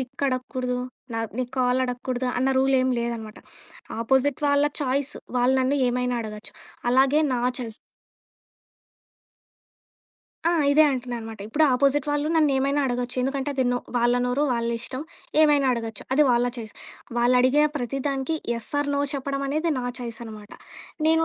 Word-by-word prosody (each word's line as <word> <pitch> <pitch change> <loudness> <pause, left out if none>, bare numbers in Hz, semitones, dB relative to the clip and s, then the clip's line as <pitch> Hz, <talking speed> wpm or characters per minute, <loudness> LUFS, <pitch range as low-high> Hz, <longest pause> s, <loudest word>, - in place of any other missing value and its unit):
Pick 260 +2 -7
అడక్కూడదు, 255 -1 -2 0.4
నా 225 - -1 0.2
నీ 255 - +1
call 250 0 +2
అడక్కూడదు, 250 0 -3
అన్న 260 +2 +1
రూలేం 260 -1 +3
లేదన్నమాట. 230 -2 -4 0.6
ఆపోజిట్ 265 +3 +2
వాళ్ళ 285 +1 +4 0.2
చాయిస్, 275 +1 -1 0.2
వాళ్ళు 250 +2 +3
నన్ను 275 +2 +1
ఏమైనా 250 0 0
అడగచ్చు. 210 -1 -8 0.4
అలాగే 270 +4 +4
నా 245 - 0 0.2
చాయిస్ 225 -3 -6 2.7
ఆ! - - +3 0.2
ఇదే 310 +1 +6
అంటున్నాననమాట, 240 -4 -5
ఇప్పుడు 310 +6 +3
ఆపోజిట్ 275 +2 +2
వాళ్ళు 290 +1 0
నన్నేమైనా 280 -1 +2
అడగొచ్చు 245 0 -2
ఎందుకంటే 270 +1 -1
అది 260 -1 +1
నో 245 - +1 0.2
వాళ్ళ 240 +1 +3
నోరు 255 +4 0
వాళ్ళిష్టం 235 +2 -2 0.4
ఏమైనా 290 -3 +5
అడగొచ్చు 225 -3 -4
అది 300 +3 +5
వాళ్ళ 240 0 +3
చాయిస్. 220 -3 -7 0.4
వాళ్ళడిగే 255 +4 +4
ప్రతి 265 +1 -3
దానికి 275 +3 -1 0.2
యెస్ 230 -1 -5
ఆర్ 290 - 0
నో 280 - +1
చెప్పడమనేది 280 +4 -1
నా - - -3 0.2
చాయిసనమాట. 225 -3 -8 0.6
నేను, 325 0 +4
255 Hz, 135 wpm, -25 LUFS, 240-275 Hz, 2.7 s, ఇదే